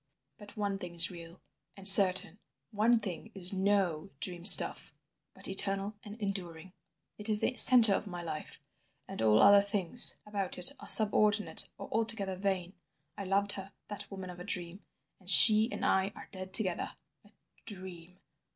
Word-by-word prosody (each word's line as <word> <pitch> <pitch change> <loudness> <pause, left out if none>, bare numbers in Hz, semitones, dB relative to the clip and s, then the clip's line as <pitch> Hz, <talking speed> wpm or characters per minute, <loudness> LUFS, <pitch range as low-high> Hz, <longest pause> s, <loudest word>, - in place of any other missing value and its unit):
But 205 +2 -16
one 200 -2 -5
thing 175 -2 -11
is 170 +1 +2
real 170 0 -15 0.4
and 195 0 -4
certain, 190 -1 +5 0.3
one 225 +2 -1
thing 200 +1 -10
is 185 0 +1
no 190 -3 -3
dream 175 -1 -5
stuff, - - +6 0.4
but - - -4
eternal 195 +1 0
and 210 +1 -14
enduring. 185 -4 -9 0.5
It 210 +1 -5
is 210 -1 +2
the 255 - -4
centre 235 -5 +6
of 205 - -5
my 175 -2 -10
life, 155 -2 -10 0.5
and - - -10
all 110 -1 +1
other 200 0 +4
things 200 +3 0
about 200 -3 -7
it 180 - 0
are - - -14
subordinate 210 -1 +2
or - - -11
altogether 220 -4 -5
vain. 185 -2 -6 0.4
I 200 - -10
loved 200 +2 -2
her, 195 -1 -11 0.2
that 205 -1 -10
woman 190 -2 -11
of 175 - -16
a - - -11
dream. 180 0 -4 0.4
And 185 -2 -8
she 215 +5 +7
and - - -7
I 190 +1 -2
are - - -15
dead 185 0 -9
together! 185 -5 0 0.3
"A 205 - -25 0.4
dream! 185 -3 -13
195 Hz, 170 wpm, -28 LUFS, 180-205 Hz, 0.5 s, she